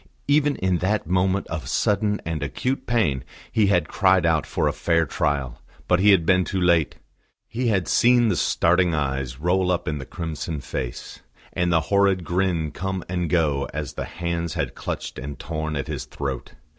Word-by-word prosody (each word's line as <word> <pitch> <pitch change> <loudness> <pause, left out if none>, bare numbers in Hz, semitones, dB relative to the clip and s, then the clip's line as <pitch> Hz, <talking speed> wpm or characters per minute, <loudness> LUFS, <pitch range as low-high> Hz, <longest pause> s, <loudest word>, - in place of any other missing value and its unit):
Even 145 0 +3
in 90 -2 0
that 105 +4 0
moment 95 +3 +1
of 80 -1 -4
sudden 105 0 +1
and 80 -2 -3
acute 125 - -2
pain 95 - +1 0.3
he 110 -3 +3
had 90 -3 +2
cried 95 -3 +3
out 80 -2 +2
for - - 0
a - - 0
fair 85 -1 +1
trial; 70 -4 -2 0.3
but 90 - +3
he 105 +2 +5
had 95 -5 +5
been 90 +1 +4
too 95 - -2
late. 85 -4 +2 0.5
He 125 +2 -2
had 95 -7 +1
seen 120 -1 +4
the 105 - +2
starting 85 +2 +2
eyes 65 -3 -2
roll 90 +3 +1
up 90 -1 0
in 75 -1 -2
the 70 - -8
crimson 80 -2 -4
face, 65 -2 -6 0.3
and 90 0 0
the 80 -1 +3
horrid 100 -2 +3
grin 85 -2 0
come 95 -1 -3
and 90 -1 -2
go 75 -5 +1
as 75 -3 -4
the - - -4
hands 85 -1 -3
had - - -2
clutched - - -5
and 70 +2 -6
torn 80 -1 -4
at 70 -1 -2
his 75 -3 -5
throat. 65 -3 -5
85 Hz, 185 wpm, -23 LUFS, 75-95 Hz, 0.5 s, he